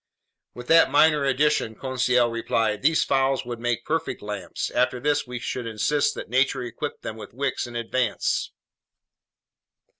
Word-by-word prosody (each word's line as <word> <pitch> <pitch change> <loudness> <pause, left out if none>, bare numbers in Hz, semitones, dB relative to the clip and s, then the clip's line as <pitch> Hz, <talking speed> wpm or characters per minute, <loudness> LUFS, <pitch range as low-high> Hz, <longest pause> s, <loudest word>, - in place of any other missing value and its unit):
"With 125 - -8
that 165 -3 +6
minor 150 0 +4
addition," 135 -4 +1
Conseil 125 -1 +1
replied, 115 -2 -1
"these 155 +3 +3
fowl 135 0 +1
would 120 -1 -5
make 120 -1 -2
perfect 160 -7 -2
lamps! 105 -4 -4
After 125 0 +1
this, 145 +1 0
we 125 0 -5
should 120 0 -4
insist 125 +7 0
that - - -6
nature 130 +1 +1
equip 120 -2 -6
them 110 - -6
with 110 - -11
wicks 135 -2 -2
in 120 - -10
advance!" 120 +2 -1
125 Hz, 150 wpm, -24 LUFS, 115-140 Hz, -, that